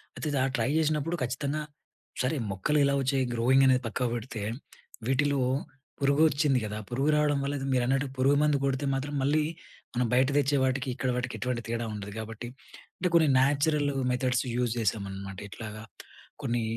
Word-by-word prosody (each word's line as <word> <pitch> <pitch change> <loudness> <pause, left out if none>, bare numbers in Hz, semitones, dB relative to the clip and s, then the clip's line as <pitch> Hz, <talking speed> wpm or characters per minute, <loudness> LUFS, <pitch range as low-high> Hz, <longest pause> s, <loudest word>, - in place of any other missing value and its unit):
అయితే - - -4 0.2
ఆ - - +2
ట్రై 115 +1 +1
చేసినప్పుడు 155 +1 +1
ఖచ్చితంగా, 140 +4 -2 0.6
సరే 130 +5 0 0.2
మొక్కలు 125 +11 +1
ఇలా 140 - +2
వచ్చాయి 135 0 +1
గ్రోయింగ్ 130 +3 +4
అనేది 130 -1 +4
పక్క 125 +2 -1
పెడితే, 115 -1 -5 0.7
వీటిలో 140 +1 +2 0.6
పురుగు 140 +2 +4
వచ్చింది 140 -2 +2
కదా! 105 0 -4
పురుగు 135 +5 0
రావడం 150 -1 +2
వల్ల 140 +1 -1
అది 135 - -4
మీరన్నట్టు 130 +2 +1
పురుగు 135 +2 +4
మందు 150 -1 +3
కొడితే 135 +1 0
మాత్రం 140 +2 -3
మళ్ళీ 150 +3 +2 0.5
మనం 125 +1 +2
బయట 130 +1 +4
తెచ్చే 145 0 +3
వాటికి 130 0 0
ఇక్కడ 130 -1 -1
వాటికి 125 - -3
ఎటువంటి 125 -2 -2
తేడా 115 0 -2
ఉండదు. 105 -1 -6
కాబట్టి 110 +2 -6 0.5
అంటే 180 - 0
కొన్ని 160 -2 +6
న్యాచురల్ 145 +2 +2 0.2
మెథడ్స్ 125 0 +1
యూజ్ 120 -2 +1
చేశామనమాట. 100 -3 -3
ఇట్లాగ 110 +1 -7 0.7
కొన్ని 120 0 0
130 Hz, 160 wpm, -28 LUFS, 120-145 Hz, 0.7 s, కొన్ని